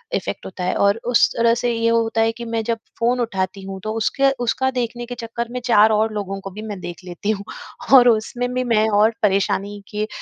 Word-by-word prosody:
effect -, -, -4 dB
होता 185 Hz, 0 st, -6 dB
है 180 Hz, -, 0 dB
और 200 Hz, +2 st, +2 dB
उस 235 Hz, -, +6 dB
तरह 230 Hz, 0 st, +3 dB
से 245 Hz, -, +2 dB
ये 230 Hz, 0 st, +1 dB
होता 230 Hz, -1 st, +1 dB
है 225 Hz, 0 st, +3 dB
कि 235 Hz, +1 st, -8 dB
मैं 230 Hz, -1 st, -2 dB
जब 230 Hz, +1 st, -1 dB, 0.2 s
फ़ोन 245 Hz, +2 st, +1 dB
उठाती 195 Hz, -4 st, -2 dB
हूँ, 190 Hz, 0 st, -7 dB
तो 215 Hz, -, -3 dB
उसके 270 Hz, +5 st, +2 dB
उसका 265 Hz, +3 st, +1 dB
देखने 240 Hz, -1 st, -3 dB
के 245 Hz, +1 st, -7 dB
चक्कर 235 Hz, 0 st, -5 dB
में 250 Hz, -, -3 dB
4 220 Hz, -3 st, +5 dB
और 215 Hz, +1 st, +1 dB
लोगों 195 Hz, -2 st, -4 dB
को 195 Hz, -, -7 dB
भी 210 Hz, +3 st, -8 dB
मैं 205 Hz, -3 st, -6 dB
देख 175 Hz, +1 st, -8 dB
लेती 180 Hz, +4 st, -3 dB
हूँ 200 Hz, -2 st, -3 dB, 0.5 s
और 245 Hz, -2 st, +9 dB
उसमें 240 Hz, +2 st, 0 dB
भी 255 Hz, 0 st, 0 dB
मैं 220 Hz, -3 st, +2 dB
और 215 Hz, +2 st, +3 dB
परेशानी 200 Hz, 0 st, 0 dB
के 210 Hz, 0 st, -2 dB
225 Hz, 230 wpm, -21 LUFS, 205-235 Hz, 0.5 s, और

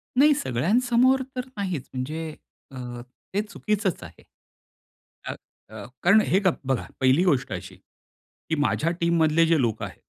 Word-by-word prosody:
नाही 295 Hz, +3 st, +6 dB
सगळ्यांसमोर 240 Hz, -, +2 dB
तर 250 Hz, 0 st, -3 dB
नाहीच 185 Hz, -9 st, -3 dB
म्हणजे, 155 Hz, +5 st, -4 dB, 0.4 s
अ, 120 Hz, -2 st, -7 dB, 0.3 s
ते 205 Hz, -, +2 dB
चुकीचंच 210 Hz, -3 st, -2 dB
आहे. -, -, -13 dB, 1.0 s
अ, -, -, -3 dB, 0.4 s
अ, 105 Hz, -2 st, -9 dB, 0.2 s
कारण 200 Hz, +5 st, +6 dB
हे 190 Hz, -, +3 dB
गप 185 Hz, -, +2 dB
बघा 135 Hz, -2 st, 0 dB
पहिली 135 Hz, +6 st, +4 dB
गोष्ट 135 Hz, -6 st, +1 dB
अशी, -, -, -7 dB, 0.7 s
की 160 Hz, -, +1 dB
माझ्या 160 Hz, +3 st, +1 dB
टीममधले 165 Hz, -1 st, +3 dB
जे 165 Hz, -4 st, +3 dB
लोक 115 Hz, -2 st, -1 dB
आहे, -, -, -7 dB
165 Hz, 140 wpm, -25 LUFS, 130-210 Hz, 1.0 s, नाही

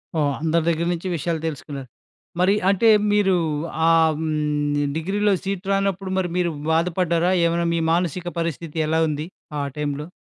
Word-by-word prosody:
ఓహ్! 145 Hz, -3 st, +1 dB
అందరి 160 Hz, +1 st, +1 dB
దగ్గర 170 Hz, 0 st, 0 dB
నుంచి 175 Hz, +2 st, -5 dB
విషయాలు 165 Hz, 0 st, -2 dB
తెలుసుకున్నారు. 140 Hz, -3 st, -6 dB, 0.5 s
మరి 190 Hz, +2 st, +4 dB, 0.2 s
అంటే 200 Hz, +3 st, +4 dB, 0.2 s
మీరు 205 Hz, -2 st, +3 dB, 0.5 s
ఆహ్, 160 Hz, -2 st, +4 dB
హ్మ్, 150 Hz, -2 st, 0 dB
డిగ్రీలో 200 Hz, +5 st, +1 dB
సీట్ 195 Hz, -1 st, -3 dB
రానప్పుడు 195 Hz, -1 st, 0 dB
మరి 185 Hz, -2 st, 0 dB
మీరు 175 Hz, -1 st, +1 dB, 0.2 s
బాధపడ్డారా? 170 Hz, +1 st, +1 dB
ఏమైనా 170 Hz, 0 st, +1 dB
మీ 170 Hz, -, +1 dB
మానసిక 175 Hz, +1 st, -1 dB
పరిస్థితి 165 Hz, -1 st, -4 dB
ఎలా 160 Hz, +1 st, +1 dB
ఉంది 150 Hz, +1 st, -3 dB, 0.3 s
ఆ -, -, 0 dB, 0.2 s
టైంలో? 150 Hz, 0 st, -3 dB
165 Hz, 145 wpm, -22 LUFS, 155-185 Hz, 0.5 s, మరి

